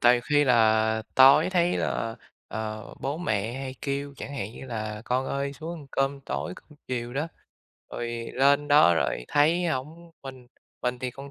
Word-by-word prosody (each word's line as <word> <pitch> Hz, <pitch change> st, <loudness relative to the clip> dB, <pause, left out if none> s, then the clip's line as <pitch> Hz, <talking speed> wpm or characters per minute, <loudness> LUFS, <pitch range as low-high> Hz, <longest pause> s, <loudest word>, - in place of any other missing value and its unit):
Tại 120 Hz, +1 st, +6 dB
vì 120 Hz, -, 0 dB
khi 145 Hz, +3 st, +2 dB
là 110 Hz, -3 st, +3 dB
tối 135 Hz, +6 st, +7 dB
thấy 175 Hz, -1 st, +2 dB
là, 115 Hz, 0 st, -2 dB, 0.3 s
ờ, 110 Hz, 0 st, -5 dB
bố 140 Hz, +2 st, -2 dB
mẹ 110 Hz, -, -1 dB
hay 135 Hz, -1 st, -5 dB
kêu 140 Hz, 0 st, -3 dB
chẳng 140 Hz, -, -7 dB
hạn 110 Hz, -4 st, -4 dB
như 130 Hz, -, -10 dB
là 110 Hz, -3 st, -5 dB
"Con 130 Hz, +2 st, 0 dB
ơi 140 Hz, 0 st, -2 dB
xuống 160 Hz, +4 st, -7 dB
ăn 145 Hz, -, -13 dB
cơm 135 Hz, 0 st, 0 dB
tối," 160 Hz, -, -4 dB
cơm -, -, -17 dB, 0.2 s
chiều 120 Hz, -1 st, -3 dB
đó, 150 Hz, +4 st, -1 dB, 0.6 s
rồi 120 Hz, -, -4 dB, 0.3 s
lên 140 Hz, +2 st, +3 dB
đó 145 Hz, -, +6 dB
rồi 70 Hz, -6 st, -1 dB
thấy 160 Hz, +5 st, +3 dB
hổng 160 Hz, +4 st, -4 dB
mình 130 Hz, -2 st, -10 dB, 0.4 s
mình 125 Hz, 0 st, -1 dB
thì 125 Hz, 0 st, -3 dB
con 140 Hz, +3 st, -10 dB
135 Hz, 185 wpm, -26 LUFS, 120-145 Hz, 0.6 s, tối